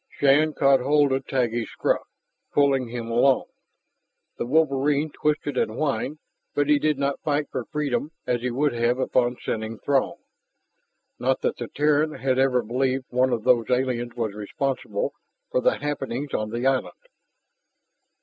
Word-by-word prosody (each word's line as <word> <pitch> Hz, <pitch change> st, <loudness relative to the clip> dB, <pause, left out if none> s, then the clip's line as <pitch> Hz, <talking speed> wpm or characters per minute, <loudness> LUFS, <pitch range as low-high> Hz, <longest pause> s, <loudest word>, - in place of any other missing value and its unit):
Shann 145 Hz, +2 st, +4 dB
caught 135 Hz, -1 st, +4 dB
hold 145 Hz, +2 st, +3 dB
of 135 Hz, 0 st, -1 dB
Taggi's 120 Hz, -3 st, -1 dB
scruff, -, -, 0 dB, 0.5 s
pulling 135 Hz, -3 st, +3 dB
him 115 Hz, -1 st, -5 dB
along. 125 Hz, +3 st, +3 dB, 0.9 s
The 120 Hz, -, -2 dB
wolverine 145 Hz, +1 st, +2 dB
twisted 150 Hz, -2 st, -1 dB
and 110 Hz, -, 0 dB
whined, 150 Hz, +1 st, -1 dB, 0.4 s
but 145 Hz, -1 st, +2 dB
he 150 Hz, -1 st, +4 dB
did 150 Hz, -1 st, +1 dB
not 140 Hz, 0 st, -1 dB
fight 145 Hz, -1 st, -1 dB
for 125 Hz, -, -3 dB
freedom 150 Hz, 0 st, -2 dB
as 120 Hz, -1 st, 0 dB
he 125 Hz, -, -1 dB
would 140 Hz, +3 st, +1 dB
have 120 Hz, +1 st, +1 dB
upon 125 Hz, -1 st, +1 dB
scenting 110 Hz, 0 st, -3 dB
Throg. 140 Hz, +2 st, 0 dB, 1.0 s
Not -, -, +1 dB
that -, -, -1 dB
the -, -, -5 dB
Terran 150 Hz, +1 st, +1 dB
had 130 Hz, -1 st, 0 dB
ever 130 Hz, -2 st, +3 dB
believed 130 Hz, +3 st, -1 dB
one 125 Hz, +1 st, +2 dB
of 115 Hz, -3 st, -1 dB
those 115 Hz, -3 st, +3 dB
aliens 125 Hz, -2 st, 0 dB
was 115 Hz, -4 st, -2 dB
responsible 135 Hz, -, -3 dB, 0.4 s
for -, -, +1 dB
the -, -, +2 dB
happenings 140 Hz, -1 st, -4 dB
on 110 Hz, 0 st, -1 dB
the 120 Hz, +3 st, -3 dB
island. 135 Hz, -1 st, +1 dB
135 Hz, 155 wpm, -24 LUFS, 120-145 Hz, 1.0 s, Shann